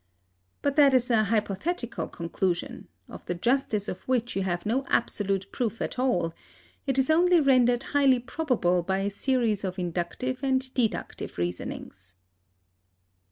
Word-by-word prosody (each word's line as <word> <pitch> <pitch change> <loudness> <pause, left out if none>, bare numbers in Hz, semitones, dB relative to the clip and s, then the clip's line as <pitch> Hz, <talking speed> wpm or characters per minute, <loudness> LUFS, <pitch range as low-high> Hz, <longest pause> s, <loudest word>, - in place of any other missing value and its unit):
But 285 +1 0
that 280 -3 +6
is 250 0 +2
a 215 -2 +4
hypothetical 225 - -2
conclusion, 175 +1 -3 0.2
of - - -10
the 175 - -1
justice 220 0 0
of 185 - -5
which 240 -2 0
you 195 - 0
have 175 -2 -2
no 245 +6 +1
absolute 195 -4 0
proof 230 -3 -2
at - - -4
all; 175 -11 +1 0.5
it 270 -1 +1
is 265 +3 +3
only 350 +2 +5
rendered 250 -3 +4
highly 275 -2 +3
probable 240 - 0
by 190 +2 -1
a 200 +1 -1
series 230 -2 0
of 185 0 -3
inductive 180 +9 -3
and 260 -1 0
deductive 235 -4 -2
reasonings. 90 +1 -5
230 Hz, 145 wpm, -27 LUFS, 185-260 Hz, 0.5 s, that